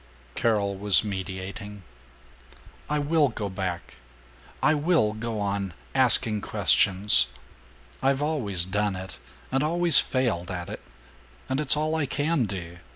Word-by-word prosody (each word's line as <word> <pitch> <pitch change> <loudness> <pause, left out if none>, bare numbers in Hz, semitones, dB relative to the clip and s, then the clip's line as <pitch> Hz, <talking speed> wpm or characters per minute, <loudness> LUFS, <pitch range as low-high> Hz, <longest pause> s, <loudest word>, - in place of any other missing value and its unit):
Carol 100 - 0
was 100 +1 +5
mediating, 95 0 -7 1.1
"I 150 - 0
will 150 +1 +2
go 110 -4 -5
back! 95 -2 -6 0.7
I - - +4
will 150 -8 +1
go 110 0 -5
on 100 -3 -3 0.2
asking 115 -5 +4
questions. 95 -13 +4 0.7
I've 135 0 +1
always 105 - 0
done 100 +1 -1
it, 95 +1 -9 0.3
and 135 +1 +1
always 170 +1 +3
failed 115 -10 -1
at 90 -2 -6
it, - - -8 0.7
and 130 +1 -2
it's 150 0 +4
all 155 +1 -1
I 160 -3 -1
can 145 -1 0
do. 90 -3 -7
105 Hz, 130 wpm, -25 LUFS, 95-140 Hz, 1.1 s, was